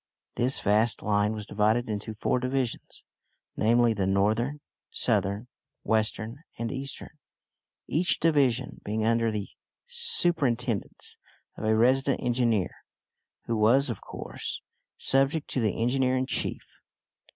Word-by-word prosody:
This 125 +3 +1
vast 110 +3 +2
line 105 0 +1
was 105 -1 -6
divided 110 +4 +1
into 110 0 -4
four 125 - 0
divisions 125 -1 -3 0.5
namely, 115 +1 +3
the 100 -3 -1
northern, 110 +9 +1 0.3
southern, 100 +5 0 0.4
western, 110 +3 -1 0.2
and 115 0 -3
eastern; 140 +2 -6 0.7
each 175 +4 +1
division 135 -6 +1
being 110 +1 -1
under 115 0 +2
the 105 -2 -3 0.4
superintendence 170 - 0 0.4
of - - -6
a 110 0 +3
resident 130 +4 +3
engineer, 120 -5 +1 0.7
who 115 - -1
was, 120 +5 +4
of - - -6
course, - - -7 0.3
subject 135 +3 +2
to 130 - 0
the 110 -3 0
engineer 130 +2 +2
in 130 - 0
chief. - - -2
115 Hz, 120 wpm, -27 LUFS, 110-135 Hz, 0.7 s, was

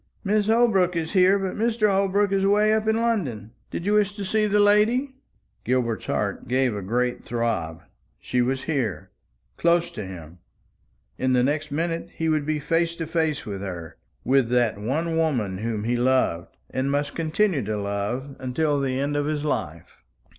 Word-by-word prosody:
"Mrs. 210 +1 +2
Holbrook 220 -6 +3
is 165 -1 -2
here, 190 0 +5
but 190 -1 -3
Mr. 225 -1 +1
Holbrook 200 0 +2
is 195 -1 +1
away 210 +2 +4
up 220 0 0
in 220 - +3
London. 160 - -1 0.2
Did 170 - -5
you 205 - +2
wish 205 -1 +2
to 205 -2 -5
see 215 +2 +1
the 210 0 +2
lady?" 215 +7 +3 0.5
Gilbert's 120 -3 -1
heart 100 -2 -2
gave 130 -1 +1
a 100 - -4
great 125 +5 -1
throb. 85 -9 -2 0.4
She 125 - 0
was 130 +2 -1
here, 130 - -2 0.5
close 170 0 +2
to 105 - -6
him! 90 -2 -10 0.8
In 130 0 +1
the 125 -1 +3
next 150 +3 0
minute 165 +3 -2
he 165 0 -1
would 155 -2 0
be 155 0 +1
face 165 +3 0
to 165 - -4
face 160 -2 -1
with 100 -2 -5
her, 85 -4 -6 0.3
with 130 -1 +2
that 120 -4 +1
one 160 +10 -1
woman 120 -13 0
whom 110 -1 -2
he 120 +2 0
loved, 120 -9 0
and 130 +1 -1
must 145 +1 -1
continue 165 0 +1
to 105 0 -2
love, 105 +7 -3
until 145 +3 0
the 130 -1 -1
end 145 +1 -1
of 145 0 0
his 150 -1 -2
life. 85 - -4
145 Hz, 180 wpm, -24 LUFS, 120-190 Hz, 0.8 s, here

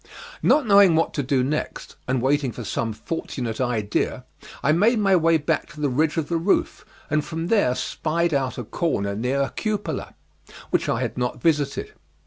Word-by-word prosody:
Not 300 -3 +4
knowing 200 -5 +6
what 165 - +1
to 145 - -1
do 135 -1 +1
next, 150 +4 -3
and 130 -1 0
waiting 140 -1 +1
for 120 - -7
some 115 +2 -2
fortunate 115 0 -4
idea, 115 -5 -1 0.4
I 140 - +4
made 210 +9 +3
my 195 -3 +3
way 165 -1 +4
back 155 +1 -1
to 150 - -12
the 145 -2 +1
ridge 150 +5 +1
of 160 -3 0
the 170 - 0
roof, 175 +5 0 0.3
and 155 -1 +2
from 165 +1 -4
there 200 - +3
spied 170 +4 -1
out 135 -2 -1
a 125 - -4
corner 100 - -1
near 125 +6 0
a 135 - -3
cupola; 210 -2 -3 0.6
which - - +1
I - - 0
had - - -3
not 125 0 -2
visited. 150 -4 0
150 Hz, 185 wpm, -23 LUFS, 125-170 Hz, 0.6 s, knowing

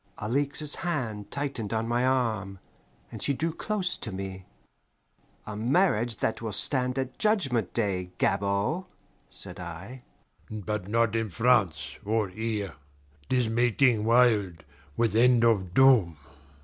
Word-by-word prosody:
Alixe's 140 +6 0
hand 115 - -3
tightened 135 -7 -4
on 115 0 -1
my 120 +1 0
arm, 110 -7 0 0.5
and - - -8
she 140 - +1
drew 165 +4 -1
close 195 -1 -1
to 110 - -6
me. 95 -1 -6 1.0
"A 105 - -6
marriage 120 - +1
that 110 - -2
will 110 -2 -4
stand 125 +4 +1
at 130 -1 -4
Judgment 135 - +2
Day, 95 -5 -1
Gabord," 100 - 0 0.4
said 95 -1 -1
I. 90 +9 -8 0.5
"But 105 -2 -4
not 115 +1 +1
in 115 -1 -1
France 90 - +1
or 105 -1 0
here. 105 -2 -3 0.6
'Tis 125 -3 +1
mating 120 0 +2
wild, 110 -8 +3 0.3
with 115 -2 +1
end 120 0 +5
of 100 -6 +2
doom." 120 - +5
115 Hz, 130 wpm, -27 LUFS, 100-125 Hz, 1.0 s, end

